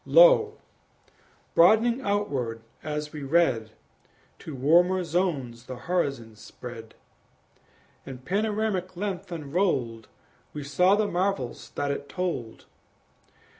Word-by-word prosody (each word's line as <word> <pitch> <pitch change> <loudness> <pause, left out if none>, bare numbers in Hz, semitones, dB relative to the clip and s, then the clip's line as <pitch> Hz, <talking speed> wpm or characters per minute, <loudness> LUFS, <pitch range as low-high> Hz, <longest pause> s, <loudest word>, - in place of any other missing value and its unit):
Lo! - - +6 1.0
broadening 225 +8 +5
outward 140 - -2 0.2
as 150 0 -4
we 150 - -6
read, 135 -7 +2 0.7
To 155 - -8
warmer 175 +7 +3
zones 150 -9 -2
the 130 - -6
horizon 135 -7 -2
spread; 115 +1 -10 1.1
In 135 -2 -8
panoramic 200 - -2
length 195 -1 -4
unrolled 140 - -1 0.5
We 150 - -5
saw 180 +8 +3
the 215 0 +1
marvels 180 -9 -2
that 145 0 -1
it 140 0 -5
told. 170 -12 -4
165 Hz, 100 wpm, -26 LUFS, 130-190 Hz, 1.1 s, Lo